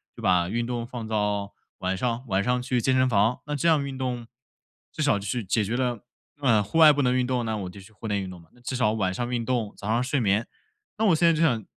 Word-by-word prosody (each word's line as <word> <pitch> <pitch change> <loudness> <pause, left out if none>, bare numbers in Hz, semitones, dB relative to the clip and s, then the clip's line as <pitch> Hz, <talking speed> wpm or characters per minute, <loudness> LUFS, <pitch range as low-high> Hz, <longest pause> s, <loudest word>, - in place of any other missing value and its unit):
就 - - -10
把 90 -1 +2
运 120 +3 -1
动 120 -1 -3
放 120 -2 -7
到 105 -2 -1 0.3
晚 95 +1 -1
上。 120 +3 -1
晚 95 -1 +1
上 125 +2 +1
去 125 0 0
健 130 - +2
身 130 0 +4
房， 110 +2 +2
那 150 - -2
这 145 +4 0
样 155 -3 +3
运 135 -1 -6
动， 125 -3 -3 0.6
至 - - -5
少 145 -8 +3
就 100 - -7
是 120 +1 -2
解 105 +3 +1
决 110 +4 -2
了 125 -3 -1 0.4
呃， 115 -6 +4
户 105 +10 -3
外 160 -2 +9
不 145 - 0
能 125 -1 +2
运 125 -1 +2
动， 125 -1 0
那 110 -1 -1
我 95 -3 -5
就 100 - -11
去 100 +3 -15
户 110 - -8
内 100 -1 0
运 95 - -5
动 90 -1 -10
嘛， 80 - -22
那 - - -22
至 125 +2 -4
少 125 -4 +2
晚 100 -4 0
上 120 +5 -3
运 120 -1 -1
动， 115 -4 -1
早 100 - -7
上 115 +3 +1
睡 135 +2 0
眠。 105 0 +1 0.5
那 220 - +1
我 185 -6 +5
现 170 +2 +3
在 165 - +5
就 160 - -1
想 120 -9 +2
120 Hz, 300 characters per minute, -26 LUFS, 105-130 Hz, 0.6 s, 外